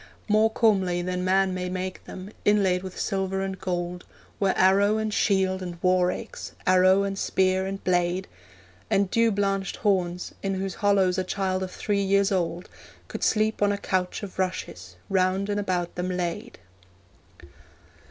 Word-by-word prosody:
More 215 +1 +4
comely 190 -6 +2
than 180 0 -2
man 190 0 +2
may 180 0 -3
make 185 0 -5
them, 185 +2 -9
inlaid 195 -3 +3
with 185 -1 -8
silver 190 0 -1
and 190 -1 -5
gold, 180 -1 -3 0.4
Were 195 -2 +2
arrow 200 +3 +4
and 220 -1 -2
shield 190 -2 +1
and 175 -2 -6
war 180 -1 +3
axe, - - -7
arrow 185 +1 +5
and 195 0 -3
spear 190 0 +1
and 195 0 -5
blade, 180 +1 +1 0.6
And 195 -1 +1
dew 230 -1 +3
blanched 195 -2 -1
horns, 180 -4 -1
in 195 -1 -1
whose 190 0 -3
hollows 195 -3 +3
a - - 0
child 185 0 -1
of 190 - -3
three 200 +2 -1
years 200 +1 +2
old 175 -2 -1 0.4
Could - - -5
sleep 215 -1 +1
on 205 0 +4
a 200 - -1
couch 185 0 -2
of 195 -2 -8
rushes, 95 - -4
round 190 +1 +1
and 205 0 0
about 180 -3 -1
them 180 +1 -3
laid. 180 +6 -3
190 Hz, 160 wpm, -26 LUFS, 185-200 Hz, 0.6 s, arrow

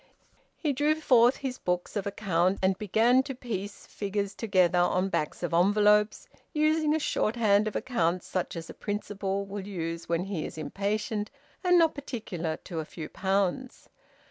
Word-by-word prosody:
He 300 -4 0
drew 295 +3 +2
forth 250 -5 +5
his 260 -2 -5
books 180 +2 -2
of 200 -1 -2
account, 190 -2 +1
and 190 0 +3
began 225 +5 +4
to 265 0 -6
piece 205 -5 -6
figures 200 -1 -3
together 185 -5 +2
on 180 +2 +2
backs 155 -1 -2
of 175 - -2
envelopes, 210 - +3 0.3
using 310 0 +2
a - - +1
shorthand 215 -6 +2
of 215 - -4
accounts 185 -8 0
such 185 -1 -3
as 165 -1 -6
a - - -9
principal 200 -1 -3
will 200 0 -6
use 165 -4 -4
when 170 +1 +1
he 190 -5 -3
is - - -7
impatient 205 +6 -2 0.3
and 360 -1 +5
not 330 -2 +4
particular 195 - -4
to 170 -3 -5
a - - -2
few 155 0 -8
pounds. 195 +6 -1
200 Hz, 165 wpm, -28 LUFS, 180-240 Hz, 0.3 s, forth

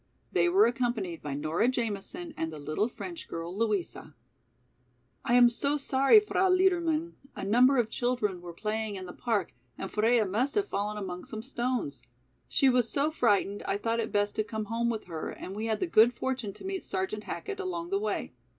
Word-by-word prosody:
They 350 - +3
were 380 +4 +6
accompanied 235 -8 -1
by 145 -2 -4
Nora 155 +9 +1
Jamison 255 - -3
and 160 0 -3
the 155 - -7
little 155 +8 -1
French 340 +7 -8
girl, 165 +2 -5
Louisa. 200 -8 -2 1.1
"I 240 - +2
am 245 -1 +8
so 280 +5 0
sorry, 275 +7 +5
Frau 385 -2 +1
Liedermann, 340 -3 +2 0.2
a - - -6
number 250 +6 +5
of 240 -3 +3
children 220 -6 -1
were 175 -1 -8
playing 215 +3 -3
in 185 -1 -6
the 180 - -8
park 215 -7 -1 0.2
and 195 - -5
Freia 225 +1 +3
must 225 +9 0
have 410 -1 +1
fallen 210 +1 -2
among 180 -3 -5
some 220 0 -7
stones. 250 - -2 0.5
She 270 - +3
was 250 -3 +3
so 290 +2 +1
frightened 205 -7 +1
I 195 - +1
thought 230 +2 -1
it 220 - -2
best 205 0 +1
to 215 - +2
come 220 0 -4
home 230 +2 0
with 225 -2 -2
her 165 -3 -5
and 190 - -7
we 220 +2 -3
had 220 -1 0
the - - +1
good 240 -7 +5
fortune 255 -6 -2
to - - -12
meet 385 0 -3
Sergeant 195 +3 -3
Hackett 405 -1 -5
along 350 -2 -4
the 395 - +2
way. 430 - -2
230 Hz, 195 wpm, -29 LUFS, 200-275 Hz, 1.1 s, am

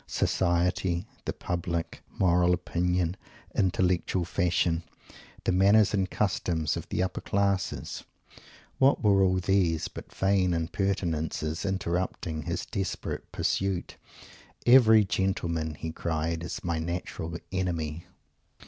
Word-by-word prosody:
Society? 90 0 +1 0.2
the - - -2
Public? 85 -1 -2 0.2
Moral 90 -1 +4
Opinion? 90 0 0 0.4
Intellectual 90 -1 +1
Fashion? 85 -2 +1 0.6
The - - +1
manners 100 +3 +5
and 95 -2 +1
customs 85 -6 0
of - - -6
the 90 - 0
Upper 95 - -3
Classes? 100 -2 -1 0.8
What 135 -1 +4
were 100 -2 +5
all 95 -1 +4
these 90 -3 +1
but - - -10
vain 95 -2 +2
impertinences, 80 -2 -1
interrupting 90 -3 -2
his 85 +2 -3
desperate 100 -5 -4
Pursuit? 95 -2 -1 0.7
"Every 110 -4 +7
gentleman" 85 -4 -1
he 80 - -5
cried 80 0 -2
"is 85 - -5
my 85 -2 -1
natural 85 0 -4
enemy!" 85 -4 -2
90 Hz, 110 wpm, -28 LUFS, 85-95 Hz, 0.8 s, Every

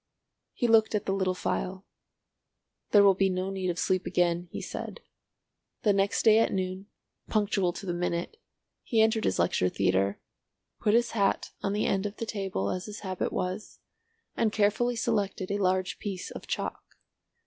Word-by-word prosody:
He 240 - 0
looked 220 -1 +4
at 210 - -1
the 195 - 0
little 190 -1 0
phial. 185 +1 -3 1.0
"There 205 -1 +7
will 200 -1 +7
be 195 +1 +2
no 185 +1 -2
need 190 -1 -2
of 175 - -2
sleep 185 0 0
again," 175 0 +1
he - - -5
said. - - -6 0.8
The 210 - +4
next 195 0 +1
day 220 0 +7
at 225 - +2
noon—punctual 190 +1 -2
to 195 - -8
the 175 - -1
minute, 175 - -2 0.4
he 225 - 0
entered 220 0 +3
his 95 - +1
lecture 90 +1 +2
theatre, 95 +2 +1 0.6
put 210 +1 +3
his 235 0 +2
hat 200 -3 +1
on 200 - -1
the 210 - 0
end 195 +1 +1
of 205 - -8
the 230 - -4
table 195 - -2
as 185 +2 -4
his 210 0 -8
habit 185 -2 -2
was, 185 +4 -3 0.6
and 220 - +2
carefully 215 +4 +2
selected 205 -5 -1
a 200 - 0
large 185 -1 0
piece 195 -3 -5
of - - -9
chalk. - - -3
195 Hz, 170 wpm, -28 LUFS, 185-210 Hz, 1.0 s, There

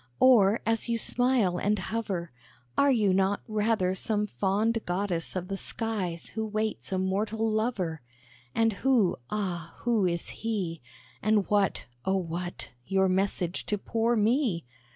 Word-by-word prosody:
Or, 225 -5 +6
as 225 +1 0
you 230 - +2
smile 235 -7 +2
and 210 +3 +1
hover, 190 -4 -3 0.4
Are 280 - +4
you 210 -7 +3
not 195 +1 +2
rather 215 -4 +1
some 210 +2 0
fond 210 +3 0
goddess 180 -2 -1
of 180 -1 -3
the 195 0 -3
skies 195 -7 -3
who 220 - -3
waits 215 -1 -2
a 190 - +1
mortal 210 +4 0
lover? 215 - -1 0.5
And 225 -1 +3
who, 235 -4 +2
ah! 175 -6 -3
who 230 -5 +2
is 170 -1 -2
he? 195 -7 -2 0.4
And 215 -1 +2
what, 205 -2 +2 0.2
oh, 190 0 +1
what! 175 0 -4 0.2
your 190 0 +3
message 185 -1 0
to 210 - 0
poor 230 +3 0
me?" 220 - +2
205 Hz, 145 wpm, -28 LUFS, 185-225 Hz, 0.5 s, Or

